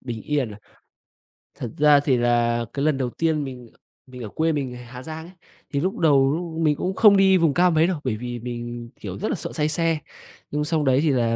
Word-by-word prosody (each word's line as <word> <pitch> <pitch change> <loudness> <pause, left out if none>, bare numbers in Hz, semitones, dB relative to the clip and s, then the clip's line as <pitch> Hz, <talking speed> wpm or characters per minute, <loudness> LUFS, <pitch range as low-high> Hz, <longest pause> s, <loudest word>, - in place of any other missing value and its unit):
Bình 115 -4 -6
yên 145 -6 -1
à? 105 - -10 1.0
Thật 115 - -5
ra 150 -1 +6
thì 140 -3 +1
là 120 -1 +1
cái 140 +1 -1
lần 150 -3 +2
đầu 130 -2 -1
tiên 160 +1 0
mình 125 -3 -8 0.4
mình 125 -2 -9
ở 105 - -6
quê, 160 +7 0
mình 140 -4 -2
người 125 0 -9
Hà 125 +1 -10
Giang 160 0 -7
ấy, 180 - -14 0.4
thì 140 - +1
lúc 185 +5 -1
đầu 140 -4 +4
lúc 165 -1 -4
mình 150 -2 +3
cũng 185 +5 -3
không 205 -2 +6
đi 190 -1 +5
vùng 165 -5 +2
cao 180 0 +4
mấy 160 +1 +3
đâu. 180 -5 -2
Bởi 115 -5 -1
vì 120 0 -5
mình, 120 0 -6
kiểu, - - -7
rất - - -2
là - - 0
sợ - - -6
say 150 0 0
xe. 165 0 0 0.5
Nhưng 150 +1 -1
sau 160 -1 0
đấy 130 0 +3
thì 155 - +2
là 115 -3 +1
140 Hz, 245 wpm, -23 LUFS, 120-160 Hz, 1.0 s, ra